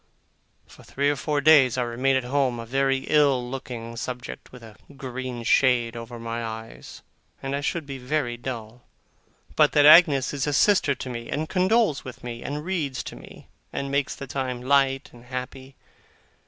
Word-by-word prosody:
For -, -, -17 dB
three 140 Hz, +1 st, 0 dB
or -, -, -1 dB
four 145 Hz, +2 st, -1 dB
days 140 Hz, -5 st, +6 dB
I 125 Hz, -, +1 dB
remain 125 Hz, +3 st, 0 dB
at 130 Hz, -, +1 dB
home, 130 Hz, -1 st, 0 dB
a 115 Hz, -, -6 dB
very 135 Hz, +2 st, +1 dB
ill 140 Hz, -5 st, +3 dB
looking 125 Hz, -3 st, -7 dB
subject, 125 Hz, +1 st, -7 dB
with 125 Hz, -2 st, -13 dB
a 110 Hz, -2 st, -13 dB, 0.2 s
green 130 Hz, -2 st, -6 dB
shade 120 Hz, -1 st, +3 dB
over 115 Hz, +1 st, -8 dB
my 115 Hz, 0 st, -4 dB
eyes; 110 Hz, 0 st, -8 dB, 0.4 s
and 135 Hz, +1 st, -2 dB
I 140 Hz, -, -2 dB
should 160 Hz, +2 st, -2 dB
be 135 Hz, -1 st, -7 dB
very 125 Hz, -1 st, -2 dB
dull, 120 Hz, -1 st, -7 dB, 0.7 s
but -, -, +4 dB
that 145 Hz, -1 st, +5 dB
Agnes 150 Hz, -4 st, +7 dB
is 140 Hz, 0 st, -2 dB
a 145 Hz, -, 0 dB
sister 155 Hz, -3 st, +3 dB
to -, -, -7 dB
me, 115 Hz, -1 st, -7 dB
and 155 Hz, +2 st, -2 dB
condoles 190 Hz, -3 st, +2 dB
with 130 Hz, -, -10 dB
me, 120 Hz, -1 st, -6 dB
and 150 Hz, +3 st, -5 dB
reads 155 Hz, -8 st, -2 dB
to -, -, -8 dB
me, -, -, -14 dB, 0.2 s
and 140 Hz, 0 st, -4 dB
makes 140 Hz, -1 st, 0 dB
the 140 Hz, -, -7 dB
time 125 Hz, -1 st, -4 dB
light 135 Hz, 0 st, +2 dB
and 120 Hz, 0 st, -15 dB
happy. 130 Hz, +1 st, -7 dB
130 Hz, 180 wpm, -25 LUFS, 120-140 Hz, 0.7 s, Agnes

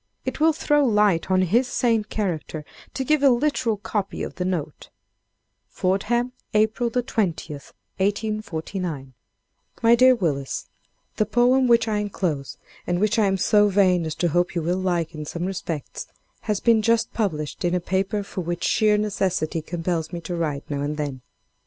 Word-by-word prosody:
It -, -, -3 dB
will 320 Hz, +1 st, +5 dB
throw 295 Hz, -1 st, +2 dB
light 210 Hz, -8 st, +2 dB
on 185 Hz, 0 st, +3 dB
his 235 Hz, +8 st, +2 dB
sane 230 Hz, -3 st, +1 dB
character 165 Hz, -8 st, -3 dB, 0.3 s
to 265 Hz, -, -1 dB
give 305 Hz, +2 st, +2 dB
a 280 Hz, -, +6 dB
literal 245 Hz, -3 st, +1 dB
copy 200 Hz, -1 st, -3 dB
of -, -, -5 dB
the 180 Hz, -, -3 dB
note: 160 Hz, -5 st, -4 dB, 0.8 s
"FORDHAM, 235 Hz, +7 st, 0 dB, 0.2 s
April 220 Hz, +3 st, +2 dB
20, 220 Hz, -10 st, -1 dB
1849 185 Hz, -, -4 dB, 0.7 s
"MY 230 Hz, +1 st, +7 dB
DEAR 255 Hz, +1 st, +6 dB
WILLIS—The 160 Hz, -, -4 dB
poem 250 Hz, +3 st, +3 dB
which 235 Hz, -1 st, +4 dB
I 215 Hz, -1 st, 0 dB
inclose, 180 Hz, -9 st, -3 dB, 0.3 s
and 175 Hz, 0 st, 0 dB
which 215 Hz, +2 st, +2 dB
I 210 Hz, -, +4 dB
am 195 Hz, 0 st, +1 dB
so 210 Hz, +2 st, +4 dB
vain 185 Hz, -4 st, +3 dB
as 155 Hz, -, -4 dB
to 175 Hz, -, 0 dB
hope 175 Hz, +3 st, 0 dB
you 170 Hz, -, -1 dB
will 175 Hz, +3 st, 0 dB
like, 175 Hz, -3 st, -1 dB
in 155 Hz, -1 st, -6 dB
some 170 Hz, +3 st, -4 dB
respects, 175 Hz, -5 st, -5 dB, 0.4 s
has 210 Hz, -2 st, +1 dB
been 230 Hz, -2 st, +4 dB
just 230 Hz, +1 st, +1 dB
published 155 Hz, -9 st, -2 dB
in 175 Hz, 0 st, +1 dB
a -, -, +1 dB
paper 190 Hz, +3 st, -1 dB
for 195 Hz, -, -5 dB
which 175 Hz, 0 st, -4 dB
sheer 215 Hz, -3 st, +3 dB
necessity 190 Hz, -6 st, -1 dB
compels 165 Hz, 0 st, -3 dB
me 175 Hz, -, -4 dB
to 175 Hz, +1 st, -4 dB
write, 150 Hz, -4 st, -2 dB
now 140 Hz, -1 st, -3 dB
and 150 Hz, +1 st, -2 dB
then. 140 Hz, -4 st, -4 dB
190 Hz, 165 wpm, -23 LUFS, 170-220 Hz, 0.8 s, MY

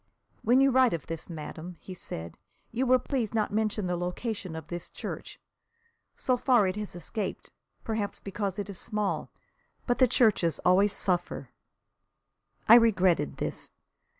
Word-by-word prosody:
"When 250 Hz, +3 st, +4 dB
you 275 Hz, 0 st, +5 dB
write 260 Hz, -3 st, +5 dB
of 165 Hz, -5 st, -3 dB
this, 165 Hz, +1 st, -6 dB
madame," 165 Hz, +2 st, -7 dB
he 185 Hz, -, -9 dB
said, 85 Hz, -, -7 dB, 0.3 s
"you 255 Hz, +3 st, 0 dB
will 255 Hz, +1 st, +6 dB
please 245 Hz, -4 st, -2 dB
not 215 Hz, -2 st, 0 dB
mention 215 Hz, -1 st, 0 dB
the 180 Hz, 0 st, 0 dB
location 180 Hz, +1 st, -4 dB
of 160 Hz, -2 st, -6 dB
this 175 Hz, +1 st, -6 dB
church. -, -, -7 dB, 0.8 s
So 255 Hz, -1 st, +1 dB
far 245 Hz, -4 st, +4 dB
it 185 Hz, 0 st, 0 dB
has 210 Hz, -3 st, -5 dB
escaped 190 Hz, +3 st, -5 dB, 0.3 s
perhaps 215 Hz, -3 st, -2 dB
because 195 Hz, -1 st, -3 dB
it 205 Hz, -, -3 dB
is 200 Hz, -3 st, -8 dB
small. 210 Hz, -3 st, -2 dB, 0.6 s
But 245 Hz, -, 0 dB
the 255 Hz, -, +7 dB
churches 215 Hz, -, +3 dB
always 195 Hz, +3 st, +5 dB
suffer." 180 Hz, -3 st, -2 dB, 1.2 s
I -, -, +9 dB
regretted 190 Hz, -, +3 dB
this. -, -, -4 dB
205 Hz, 150 wpm, -29 LUFS, 175-230 Hz, 1.2 s, I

